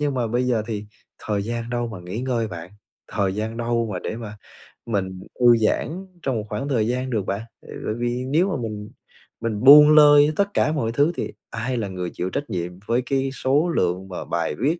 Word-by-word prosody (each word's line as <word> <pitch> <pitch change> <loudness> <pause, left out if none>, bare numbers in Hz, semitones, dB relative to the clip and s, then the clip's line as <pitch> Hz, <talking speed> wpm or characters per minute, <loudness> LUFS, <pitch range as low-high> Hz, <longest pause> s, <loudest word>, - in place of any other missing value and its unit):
nhưng 145 -2 0
mà 120 -2 0
bây 120 +3 0
giờ 115 -4 +1
thì 105 -2 -4 0.3
thời 105 -2 -2
gian 115 +1 -4
đâu 120 -1 -1
mà 110 -5 -7
nghỉ 90 +6 -5
ngơi 120 -4 -1
bạn, 85 0 -8 0.4
thời 95 -1 -1
gian 110 +2 -3
đâu 115 -1 0
mà 90 - -3
để 110 - -5
mà 105 -3 -8 0.5
mình 95 -4 -2 0.2
thư 120 -1 +6
giãn 170 - -1 0.2
trong 130 -3 0
một 105 -1 -3
khoảng 105 +7 -3
thời 115 -5 +1
gian 125 +1 -1
được 110 -6 -1
bạn? 100 +2 -2 0.2
À, - - -17 0.2
tại 110 - -1
vì 120 +1 -2
nếu 175 +7 +2
mà - - -1
mình 105 -2 -5 0.5
mình 115 -1 -2
buông 150 +2 +10
lơi 145 0 +7
tất 200 0 0
cả 150 - +2
mọi 115 -8 -1
thứ 145 +7 +2
thì - - -4 0.2
ai 120 +3 -3
là 105 -3 -2
người 90 -2 -4
chịu 90 - -3
trách 140 +3 -4
nhiệm 90 -3 -3 0.2
với 120 +2 +1
cái 135 -1 0
số 145 +6 +1
lượng 90 - 0
và 90 - -6
bài 85 -1 -2
viết 155 +7 +1
115 Hz, 225 wpm, -23 LUFS, 105-135 Hz, 0.5 s, buông